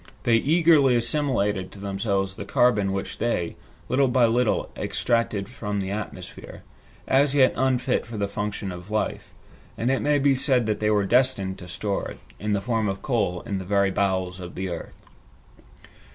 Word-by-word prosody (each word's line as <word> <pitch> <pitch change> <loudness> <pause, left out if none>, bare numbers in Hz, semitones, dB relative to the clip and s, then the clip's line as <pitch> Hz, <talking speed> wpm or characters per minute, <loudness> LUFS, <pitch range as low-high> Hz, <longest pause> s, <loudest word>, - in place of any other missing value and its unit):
They 115 -1 +4
eagerly 150 -1 +4
assimilated 120 -6 0
to 100 - -12
themselves 100 -1 -1
the - - -6
carbon 105 -3 +2
which 95 0 -4
they, 115 -8 -1 0.3
little 135 +1 +3
by 125 -1 +4
little, 115 0 +1
extracted 115 -4 -1
from 105 -4 -4
the 95 0 -3
atmosphere, 105 0 -7 0.4
as 140 +1 +3
yet 130 -2 +5
unfit 130 -1 +1
for 115 -2 -7
the 100 -1 0
function 100 -1 -4
of 90 +2 -9
life, 110 0 -2 0.5
and 120 +3 +1
it 135 - +1
may 145 0 +2
be 140 -1 +3
said 130 -2 +2
that 105 -1 -1
they 105 - +1
were 105 -2 +2
destined 120 -4 +1
to 90 - -10
store 100 +3 -2
it, - - -10 0.2
in 105 0 -1
the 100 - 0
form 115 -1 0
of 95 0 -5
coal, 105 -8 0
in 105 -5 -3
the - - -5
very 100 +1 +2
bowels 95 -2 -1
of 90 -1 -8
the 95 0 -3
earth. 85 -1 -7
105 Hz, 180 wpm, -25 LUFS, 100-125 Hz, 0.5 s, yet